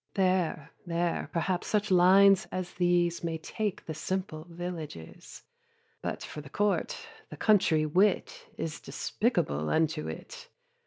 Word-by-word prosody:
There, 185 Hz, -6 st, +1 dB
there, 170 Hz, -1 st, -1 dB
perhaps 175 Hz, +1 st, -1 dB
such 210 Hz, -1 st, 0 dB
lines 190 Hz, +2 st, +6 dB
as 185 Hz, -1 st, -4 dB
these 175 Hz, -1 st, +1 dB
May 165 Hz, -1 st, -2 dB
take 205 Hz, +5 st, -4 dB
the 160 Hz, -, -4 dB
simple 165 Hz, 0 st, -4 dB
villages; 165 Hz, -, -8 dB, 0.6 s
But -, -, -4 dB
for 150 Hz, -, -7 dB
the 140 Hz, -, -12 dB
court, 205 Hz, +6 st, 0 dB, 0.3 s
the -, -, -9 dB
country 175 Hz, -8 st, +3 dB
wit 185 Hz, +7 st, +1 dB
Is 160 Hz, -1 st, -4 dB
despicable 170 Hz, -, -1 dB
unto 160 Hz, -1 st, +1 dB
it. -, -, -8 dB
175 Hz, 125 wpm, -29 LUFS, 160-190 Hz, 0.6 s, lines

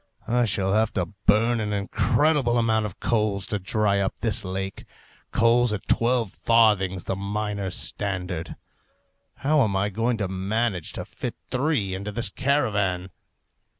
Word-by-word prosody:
I 120 Hz, +1 st, +2 dB
shall 95 Hz, -2 st, +1 dB
have 110 Hz, +1 st, +2 dB
to 90 Hz, -4 st, -1 dB, 0.2 s
burn 115 Hz, +3 st, +4 dB
an 105 Hz, -1 st, -2 dB
incredible 120 Hz, +6 st, +2 dB
amount 110 Hz, -2 st, +2 dB
of 95 Hz, -, -12 dB
coals 105 Hz, -4 st, 0 dB
to 105 Hz, -3 st, -2 dB
dry 100 Hz, +1 st, +1 dB
up 95 Hz, -, -2 dB
this 110 Hz, -2 st, +1 dB
lake 95 Hz, +1 st, -5 dB, 0.5 s
coals 120 Hz, +1 st, +3 dB
at 105 Hz, -2 st, -4 dB
twelve 115 Hz, -3 st, +2 dB
farthings 105 Hz, -5 st, +3 dB
the 95 Hz, -, -2 dB
miners' 100 Hz, -1 st, -3 dB
standard! 90 Hz, -4 st, -4 dB, 0.9 s
How 150 Hz, 0 st, +4 dB
am 100 Hz, -4 st, 0 dB
I 100 Hz, +2 st, +1 dB
going 115 Hz, +4 st, 0 dB
to 100 Hz, -3 st, -1 dB
manage 95 Hz, 0 st, -2 dB
to -, -, -5 dB
fit -, -, -6 dB, 0.2 s
three 125 Hz, -8 st, 0 dB
into 100 Hz, +2 st, -4 dB
this 115 Hz, -2 st, +1 dB
caravan? 100 Hz, -10 st, 0 dB
105 Hz, 150 wpm, -25 LUFS, 95-115 Hz, 0.9 s, burn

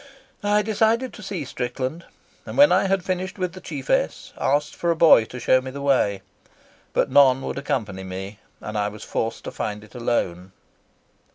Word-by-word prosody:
I 205 Hz, +1 st, +2 dB
decided 225 Hz, +4 st, +1 dB
to -, -, -11 dB
see 195 Hz, -7 st, -4 dB
Strickland, 130 Hz, +6 st, -4 dB, 0.4 s
and -, -, -8 dB
when 290 Hz, +1 st, +7 dB
I -, -, +4 dB
had 190 Hz, -1 st, 0 dB
finished 185 Hz, +1 st, -3 dB
with 180 Hz, -2 st, -2 dB
the 185 Hz, -, -10 dB
chiefess 145 Hz, -6 st, -2 dB
asked 145 Hz, +2 st, 0 dB
for 170 Hz, -, -1 dB
a 170 Hz, -, +3 dB
boy 160 Hz, -8 st, +6 dB
to 125 Hz, -, -9 dB
show 130 Hz, +2 st, +3 dB
me 130 Hz, -, -6 dB
the 140 Hz, +2 st, -7 dB
way. 125 Hz, -9 st, +1 dB, 0.7 s
But -, -, +1 dB
none 135 Hz, -1 st, +5 dB
would -, -, -3 dB
accompany 105 Hz, -9 st, -3 dB
me, 95 Hz, +2 st, -7 dB, 0.2 s
and 105 Hz, 0 st, -4 dB
I 105 Hz, -, +1 dB
was 105 Hz, 0 st, -8 dB
forced 115 Hz, -, -3 dB
to -, -, -6 dB
find 105 Hz, 0 st, -4 dB
it 110 Hz, -, -17 dB
alone." 95 Hz, -7 st, -2 dB
135 Hz, 185 wpm, -23 LUFS, -, 0.7 s, when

